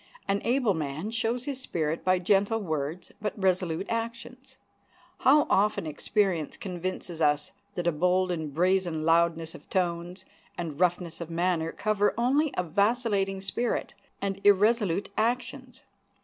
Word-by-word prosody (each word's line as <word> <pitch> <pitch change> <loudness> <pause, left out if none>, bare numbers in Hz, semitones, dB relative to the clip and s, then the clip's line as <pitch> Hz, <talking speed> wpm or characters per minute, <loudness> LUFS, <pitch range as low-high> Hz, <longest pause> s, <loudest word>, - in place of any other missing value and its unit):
An 200 0 +1
able 245 -3 +2
man 155 +5 -3
shows 230 +2 -1
his 280 -3 -3
spirit 160 -8 -2
by 185 0 +3
gentle 200 +4 +2
words 160 -2 -3
but 210 0 -3
resolute 185 -2 +1
actions. 240 +3 -5 0.6
How 290 +3 +5
often 205 -3 +2
experience 170 +1 -1
convinces 180 -4 -5
us 150 -1 +2 0.2
that 175 - -3
a 170 - +3
bold 180 +3 +2
and 160 -4 -3
brazen 175 0 +1
loudness 165 0 +2
of - - -14
tones 175 0 -2 0.3
and 165 -4 -5
roughness 175 -2 0
of 170 - -5
manner 165 -1 0
cover 210 -1 +1
only 275 +5 +2
a 180 - +2
vacillating 200 +1 +1
spirit 235 +5 -2 0.3
and 195 0 -2
irresolute 205 -2 +3
actions! 250 +2 -2
185 Hz, 135 wpm, -28 LUFS, 170-220 Hz, 0.6 s, How